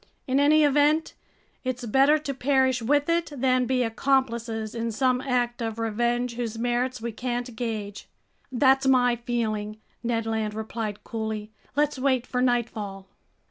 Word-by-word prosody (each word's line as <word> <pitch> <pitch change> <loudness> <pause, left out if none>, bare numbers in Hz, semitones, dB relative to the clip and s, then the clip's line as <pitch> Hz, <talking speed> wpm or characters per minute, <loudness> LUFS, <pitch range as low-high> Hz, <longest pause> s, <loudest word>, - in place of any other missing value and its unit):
In 265 +1 +2
any 300 +2 +5
event, 295 +2 +3 0.5
it's 255 -1 -3
better 270 +6 +4
to 290 -2 -4
perish 260 -2 +2
with 290 +5 +2
it 335 -1 0
than 255 -1 +2
be 255 -1 +2
accomplices 230 -2 0
in 230 0 -2
some 255 +2 +1
act 245 -2 -1
of 225 -1 -3
revenge 240 +2 0
whose 230 -2 -3
merits 245 +1 -1
we 235 - -2
can't 245 +1 -4
gauge." 215 -3 -5 0.4
"That's 265 +1 +3
my 250 -2 +4
feeling," 215 -3 -2 0.2
Ned 230 -1 -1
Land 220 -1 -2
replied 220 -1 -4
coolly. 220 -2 -4 0.2
"Let's 295 -1 +1
wait 260 -2 +1
for 250 0 -2
nightfall." 215 -6 -1
245 Hz, 145 wpm, -26 LUFS, 225-265 Hz, 0.5 s, any